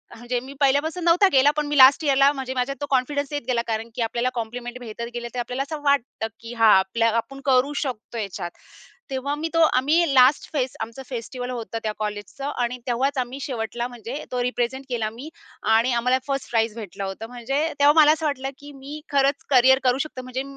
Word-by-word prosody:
म्हणजे 240 +1 -3
मी 265 +3 -10
पहिल्यापासून 290 +5 +1
नव्हता 345 +4 +5
केला, 270 +2 +5
पण 300 - +1
मी 295 0 -1
लास्ट 270 +4 +8
यिअरला 275 -1 +4
म्हणजे 265 -2 -4
माझ्यात 255 +2 -1
तो - - -1
कॉन्फिडन्स 280 +2 0
येत 290 - -1
गेला, 245 -2 +1
कारण 225 0 -2
की - - -3
आपल्याला 235 +2 0
कॉम्प्लिमेंट 240 +1 -5
भेटत 235 -1 -6
गेले, 240 0 -4
तर - - -2
आपल्याला 250 +2 -2
असं 300 +1 -6
वाटतं 275 -5 0
की 230 +1 -8
हां, 225 -1 +5
आपल्या 225 +5 +1
आपण 275 +4 -4
करू 270 +1 +3
शकतो 240 -4 -4
ह्याच्यात. 195 -5 -4 0.6
तेव्हा 270 +2 -2
मी 320 +2 -3
तो 330 - +3 0.2
आम्ही 300 +4 +2
लास्ट 260 +3 +5
फेस्ट 260 -4 -1
आमचं 230 +4 -6
फेस्टिवल 245 0 -5
होतं 230 -2 -5
त्या 215 - -1
कॉलेजचं 210 +7 -4
आणि 245 +1 -1
तेव्हाच 265 +4 0
आम्ही 255 +2 -4
शेवटला 240 -2 -3
म्हणजे 245 +4 -7
तो 250 -1 -1
रिप्रेझेंट 250 +2 -2
केला 230 -3 -1
मी 255 +7 -9 0.5
आणि 235 +3 +3
आम्हाला 250 +2 +2
1st 275 -1 -3
प्राइज 225 -2 +1
भेटलं 200 -3 -6
होतं. 195 +4 -6
म्हणजे 250 +4 -2 0.2
तेव्हा 290 +1 +6
मला 300 0 +7
असं 320 0 -4
वाटलं 270 -2 -1
की 290 +1 -11
मी 285 +3 -8
खरंच 280 0 +2
करियर 265 0 +6
करू 250 0 +3
शकते. 280 -4 -8
म्हणजे 255 +1 -4
255 Hz, 205 wpm, -23 LUFS, 235-280 Hz, 0.6 s, लास्ट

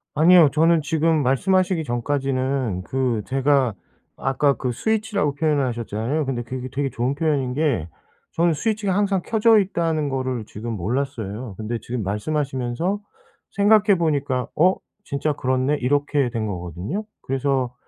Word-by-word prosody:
아니요. 165 0 +7
저는 165 +2 +4
지금 160 0 +1
말씀하시기 180 +6 +2
전까지는 130 -4 -1
그 125 -2 -1
제가 135 +1 +2 0.4
아까 140 +1 +1
그 125 -2 -3
스위치라고 210 - 0
표현을 145 -1 +1
하셨잖아요. 120 +5 -2
근데 125 -3 -2
그게 130 +2 -6
되게 140 +1 -1
좋은 125 +4 -1
표현인 145 -5 0
게 140 - 0 0.5
저는 170 0 +2
스위치가 210 +2 -1
항상 200 -2 +1
켜져 225 0 +4
있다는 165 -6 0
거를 130 -4 -2
지금 115 +3 -6
몰랐어요. 110 0 -3
근데 110 +2 -3
지금 120 +1 -4
말씀하시면서 135 - -2 0.5
생각해 205 0 +4
보니까 145 -6 0
'어? 180 +4 +4 0.3
진짜 150 -2 -1
그렇네?' 130 +1 0
이렇게 145 0 +1
된 115 -2 -3
거거든요. 90 - -4 0.2
그래서 135 -2 -1
140 Hz, 340 characters per minute, -22 LUFS, 125-160 Hz, 0.5 s, 아니요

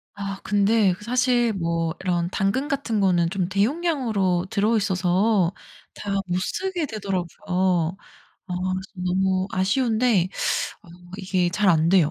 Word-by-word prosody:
아 195 -1 -5
근데 205 -1 +3
사실 245 -1 +2
뭐 165 -3 -1
이런 175 -2 0
당근 200 +11 0
같은 275 -7 -1
거는 175 -4 +2
좀 185 -1 -1
대용량으로 210 - 0
들어있어서 200 -2 +2 0.4
다 205 - -5 0.2
못 180 0 0
쓰게 360 - -2
되더라고요. 185 - -1 0.5
아 180 - -4 0.2
그래서 190 +1 -5
너무 190 +1 +1
아쉬운데 220 0 +2 0.6
어 - - -18 0.3
이게 185 -2 0
잘 200 +3 +1
안돼요. 165 -1 +4
195 Hz, 255 characters per minute, -24 LUFS, 180-220 Hz, 0.6 s, 안돼요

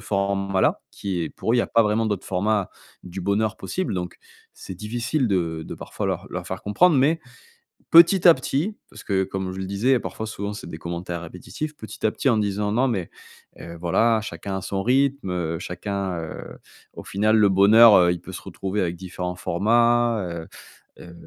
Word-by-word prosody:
format-là, 100 -2 0
qui 95 -3 -4
est 80 - -3
pour 115 - -3
eux - - +3
il - - +3
y - - +5
a - - -2
pas 115 - +4
vraiment 110 +2 +1
d'autre 105 -3 -3
format 100 +1 0 0.3
du 90 +1 -7
bonheur 105 +3 0
possible. 185 - -3
Donc 90 -1 -4 0.4
c'est 95 - -9
difficile 120 - -2
de 85 -4 -1
de - - -7
parfois - - -5
leur - - -3
leur 90 0 -5
faire 95 0 -6
comprendre. 155 - +3
Mais 155 +5 +3 0.7
petit 170 +2 +7
à 165 - +9
petit, 150 +10 -2
parce - - -12
que 95 -2 +1
comme 95 -1 -4
je 95 - -7
le 95 - -3
disais, 115 +7 +2
parfois, 110 - -6
souvent, 105 -1 -5
c'est 105 - -8
des 80 - -7
commentaires 85 0 -5
répétitifs, 150 - -7
petit 110 - -10
à - - +2
petit 135 - -1
en 120 - +3
disant: 105 -1 -1
«Non, 125 +5 +2
mais, 100 -9 -2 0.5
heu, 85 0 -9
voilà, 110 +6 +2
chacun 95 -1 -5
à - - -5
son 95 +1 -3
rythme, 135 -1 +1
heu, 85 -2 -2
chacun, 95 +1 -4
heu 80 -1 -8 0.4
au - - -8
final, 110 +3 +1
le 105 -2 +5
bonheur, 105 +4 +7
heu, 90 -1 +5
il 90 - -5
peut - - -10
se - - -8
retrouver 95 +2 -3
avec 85 -1 -2
différents 90 0 -5
formats 115 +5 +2
heu». 85 -2 -6 0.5
Heu, 85 - -12
100 Hz, 200 wpm, -23 LUFS, 90-115 Hz, 0.7 s, à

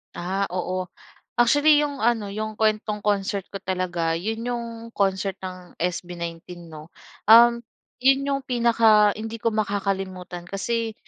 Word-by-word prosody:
Ah, 190 +3 -2
oo. 185 0 -3 0.4
Actually 290 +5 +5
'yong 285 -2 -3
ano, 225 -3 +1
'yong 215 +1 -4
kuwentong 215 -1 0
concert 200 -1 0
ko 195 - -5
talaga 175 -3 -1
'yon 220 +7 -3
'yong 240 -1 -2 0.3
concert 195 -1 0
ng 185 -1 -8
SB19 175 -1 -5
'no. 155 +1 -12 0.3
Um, 235 +2 +8 0.4
'yon 270 +2 +4
'yong 275 0 0
pinaka 230 -4 +4
hindi 225 0 -6
ko 230 - +2
makakalimutan 195 -4 -3
kasi 225 +4 -2
205 Hz, 130 wpm, -24 LUFS, 185-230 Hz, 0.4 s, Um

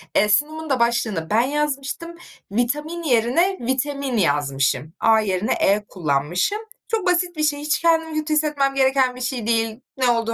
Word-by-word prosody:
Eee, 210 - +4
sunumun 310 +8 +1
da 265 -3 +1
başlığını 235 -8 0
ben 220 +2 +3
yazmıştım. 295 +4 -2 0.4
"Vitamin" 295 +10 -2
yerine 280 - +2
"vitemin" 265 0 -1
yazmışım. 145 -3 0
A 225 -1 +4
yerine 200 -1 0
E 205 +1 +1
kullanmışım. 170 - -1 0.3
Çok 445 -4 -1
basit 360 -1 +1
bir 305 - -1
şey, 295 -1 +1
hiç 300 +1 0
kendimi 325 -2 +2
kötü 310 0 -2
hissetmem 295 -3 +1
gereken 265 -1 +2
bir 250 - -9
şey 250 -3 -3
değil. 225 0 0 0.2
Ne 255 -2 +2
olduğu 230 -1 +1
260 Hz, 165 wpm, -22 LUFS, 220-305 Hz, 0.4 s, Eee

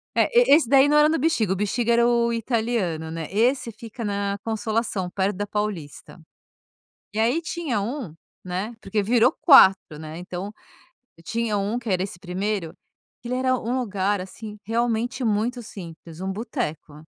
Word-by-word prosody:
É, - - +4
e - - +8
e - - +10
esse 295 -7 +2
daí 275 +1 +6
não 295 - +3
era 300 +1 +6
no 325 - +1
Bixiga, 250 - +1
o - - -2
Bexiga 230 +4 0
era 235 0 +4
o 235 -1 +2
italiano, 225 -8 -1
né. 160 -1 -5
Esse 235 +3 +1
fica 225 +1 -8
na 200 0 -1
Consolação 220 -4 -2
perto 190 +1 -1
da 205 - -3
Paulista. 195 -6 -5 0.9
E 215 - -3
aí 245 +9 +2
tinha 315 -9 -2
um, 225 - -4 0.3
né, 190 +6 -4
porque 210 +1 -1
virou 240 +6 +4
4, 190 - +6
né, 155 +1 -8
então 180 +3 -6 0.7
tinha 225 +1 -1
um 205 +5 -1
que 235 - -7
era 185 -1 +1
esse 190 -2 -7
1º, 190 -1 -3 0.5
que 235 - -8
ele 250 - -1
era 255 0 +2
um 245 +3 -2
lugar, 200 -3 -1
assim, 210 +3 -9
realmente 235 +3 -1
muito 225 +3 0
simples, 170 -4 -10
um 190 0 -2
boteco. 195 - -4
215 Hz, 170 wpm, -24 LUFS, 190-240 Hz, 0.9 s, e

